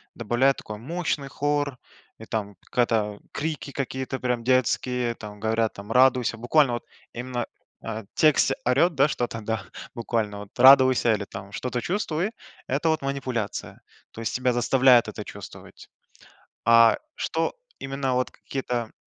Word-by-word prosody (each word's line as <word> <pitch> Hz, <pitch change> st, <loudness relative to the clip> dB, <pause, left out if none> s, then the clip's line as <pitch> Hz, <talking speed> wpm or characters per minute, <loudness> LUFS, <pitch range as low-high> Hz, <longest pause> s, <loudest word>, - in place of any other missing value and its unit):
добавляют 120 Hz, +4 st, +2 dB
такой 105 Hz, -, -7 dB
мощный 150 Hz, +3 st, -3 dB
хор, 145 Hz, -1 st, -1 dB, 0.4 s
и 110 Hz, -, -11 dB
там, 105 Hz, -3 st, -4 dB, 0.2 s
когда 110 Hz, -4 st, +1 dB
крики 150 Hz, -2 st, -4 dB
какие-то 130 Hz, -1 st, -4 dB
прям 125 Hz, -2 st, -1 dB
детские, 125 Hz, -1 st, +1 dB
там, 105 Hz, -2 st, -10 dB
говорят, 110 Hz, +1 st, 0 dB
там: 100 Hz, +1 st, -9 dB
радуйся. 125 Hz, -3 st, +4 dB
Буквально, 125 Hz, +3 st, +3 dB
вот, 120 Hz, -, -4 dB, 0.3 s
именно, 120 Hz, 0 st, -3 dB, 0.4 s
а, 110 Hz, 0 st, -5 dB
текстe 155 Hz, -2 st, +4 dB
орёт, 145 Hz, +8 st, +3 dB
да, 140 Hz, +1 st, +4 dB
что-то, 120 Hz, -5 st, -3 dB
да, 110 Hz, +1 st, -3 dB, 0.3 s
буквально, 110 Hz, -3 st, -2 dB
вот, 100 Hz, -1 st, -12 dB
радуйся 130 Hz, -2 st, +7 dB
или, 105 Hz, -1 st, -2 dB
там, 100 Hz, 0 st, -9 dB
что-то 125 Hz, +3 st, -3 dB
чувствуй, 185 Hz, 0 st, -1 dB, 0.4 s
это 145 Hz, +5 st, 0 dB
вот 160 Hz, -1 st, +1 dB
манипуляция. 130 Hz, -6 st, -4 dB, 0.3 s
То 115 Hz, -, -9 dB
есть 115 Hz, -, -2 dB
тебя 125 Hz, 0 st, +1 dB
заставляют 125 Hz, 0 st, +5 dB
это -, -, -6 dB
чувствовать. -, -, -11 dB, 0.8 s
А, 115 Hz, 0 st, +6 dB, 0.2 s
что -, -, -1 dB, 0.2 s
именно, 135 Hz, -1 st, -2 dB
вот, 125 Hz, 0 st, 0 dB
какие-то, 125 Hz, -4 st, -4 dB
125 Hz, 140 wpm, -25 LUFS, 115-135 Hz, 0.8 s, радуйся